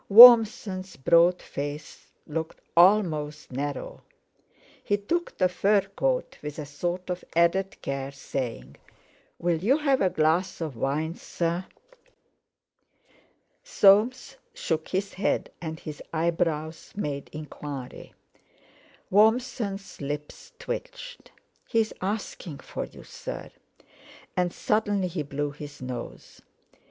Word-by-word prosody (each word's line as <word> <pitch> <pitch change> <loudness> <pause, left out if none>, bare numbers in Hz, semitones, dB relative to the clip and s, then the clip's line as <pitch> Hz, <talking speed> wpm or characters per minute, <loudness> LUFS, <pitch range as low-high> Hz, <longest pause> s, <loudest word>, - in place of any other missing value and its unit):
Warmson's 215 -4 +8
broad 170 +6 +4
face 145 +1 -6 0.2
looked 160 +1 -4 0.2
almost 165 -6 +3
narrow; 140 +1 -4 0.8
he 205 - +1
took 340 +13 -2
the 185 - +4
fur 195 +3 +3
coat - - -1
with 150 -1 -6
a 150 - -5
sort 175 +6 -3
of 180 - -4
added 175 +3 +2
care, 135 0 -3
saying: 120 - -5 0.6
"Will 170 -2 0
you 260 +8 +4
have 280 -3 +2
a 190 - +4
glass 170 +4 +1
of 155 -6 -4
wine, 150 +7 -1
sir?" 170 +1 -3 2.0
Soames 255 - +4 0.2
shook 160 -1 -2
his 195 +1 -2
head, 195 - -1
and 160 -1 -5
his 150 -1 -8
eyebrows 165 -1 -1
made 145 -8 -4
enquiry. 145 -3 -8 1.0
Warmson's 215 -2 +1
lips 145 - -6
twitched. - - -7 0.4
"He's 225 -1 +1
asking 190 -6 -4
for - - -5
you, - - -14
sir;" - - -7 0.8
and 180 -1 +1
suddenly 205 -3 0
he 170 -2 -3
blew 145 0 -3
his 145 0 -10
nose. 125 -2 -7
170 Hz, 110 wpm, -27 LUFS, 150-205 Hz, 2.0 s, Warmson's